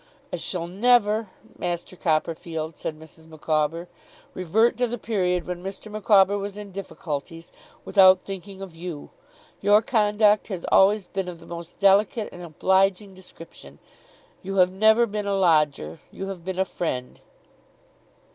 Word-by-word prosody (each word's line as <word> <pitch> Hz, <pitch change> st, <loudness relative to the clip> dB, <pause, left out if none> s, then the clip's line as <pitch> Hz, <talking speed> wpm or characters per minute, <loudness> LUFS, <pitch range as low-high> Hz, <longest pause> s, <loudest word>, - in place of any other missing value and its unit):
'I -, -, -1 dB
shall 175 Hz, -3 st, -3 dB
never, 215 Hz, +2 st, +2 dB, 0.3 s
Master 175 Hz, +1 st, -4 dB
Copperfield,' 160 Hz, -1 st, -2 dB
said 155 Hz, -1 st, -6 dB
Mrs. 160 Hz, +1 st, -15 dB
Micawber, 155 Hz, +1 st, -2 dB, 0.5 s
'revert 205 Hz, +7 st, +2 dB
to 245 Hz, 0 st, +1 dB
the 240 Hz, +1 st, -4 dB
period 180 Hz, -6 st, -1 dB
when 180 Hz, -1 st, -5 dB
Mr. 195 Hz, +3 st, -8 dB
Micawber 205 Hz, -1 st, +3 dB
was 200 Hz, 0 st, -6 dB
in 205 Hz, -1 st, -8 dB
difficulties, 165 Hz, -3 st, -6 dB, 0.3 s
without 185 Hz, -2 st, +6 dB
thinking 195 Hz, 0 st, -7 dB
of 180 Hz, -4 st, -10 dB
you. 165 Hz, -3 st, -8 dB, 0.5 s
Your 205 Hz, +2 st, +4 dB
conduct 210 Hz, -2 st, +2 dB
has 185 Hz, -5 st, -5 dB
always 200 Hz, +1 st, +4 dB
been 195 Hz, 0 st, -4 dB
of 175 Hz, -2 st, -7 dB
the 165 Hz, -, -15 dB
most 170 Hz, 0 st, -9 dB
delicate 200 Hz, +2 st, +3 dB
and 175 Hz, -, -11 dB
obliging 190 Hz, +4 st, +1 dB
description. 185 Hz, -3 st, -13 dB, 0.6 s
You 195 Hz, 0 st, -5 dB
have 185 Hz, -1 st, +4 dB
never 220 Hz, +4 st, +4 dB
been 210 Hz, -2 st, -4 dB
a 200 Hz, -, 0 dB
lodger. 150 Hz, -, +1 dB
You 195 Hz, 0 st, -7 dB
have 185 Hz, -3 st, -7 dB
been 185 Hz, +1 st, -5 dB
a 190 Hz, -, +2 dB
friend. 130 Hz, -9 st, -4 dB
190 Hz, 145 wpm, -24 LUFS, 170-205 Hz, 0.6 s, without